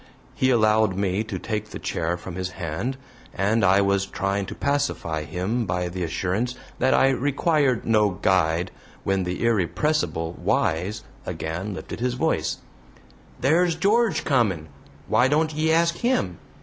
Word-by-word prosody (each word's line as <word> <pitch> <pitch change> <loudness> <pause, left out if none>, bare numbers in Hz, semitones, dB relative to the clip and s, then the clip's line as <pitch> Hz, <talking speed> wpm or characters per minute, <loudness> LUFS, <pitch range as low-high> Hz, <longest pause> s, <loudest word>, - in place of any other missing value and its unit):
He 130 - +1
allowed 110 -4 +3
me 100 +1 0
to 105 -4 -4
take 105 +2 -4
the - - -6
chair 85 0 -2
from 90 +1 -8
his 90 0 -4
hand, 90 - -3 0.4
and 105 +3 +1
I 95 +1 +5
was 100 0 +1
trying 100 0 -2
to - - -6
pacify 140 - -1
him 95 - -2
by 90 0 -1
the 90 +1 -4
assurance 95 +9 -1 0.2
that 130 +2 +3
I 135 - +5
required 140 -1 +1
no 105 -2 +4
guide 90 -2 +1 0.3
when 95 -1 0
the 90 +6 -2
irrepressible 110 - 0
Wise 90 +7 0 0.2
again 90 +6 -4
lifted - - -7
his 125 +1 0
voice: - - 0 0.9
"Theer's 170 +4 +3
George 195 -2 +2
comin'! 100 - +1 0.4
why 120 +4 +4
don't 155 +3 +1
ye 155 +1 +1
ask 170 +1 +3
him? 235 - 0
105 Hz, 150 wpm, -24 LUFS, 90-135 Hz, 0.9 s, I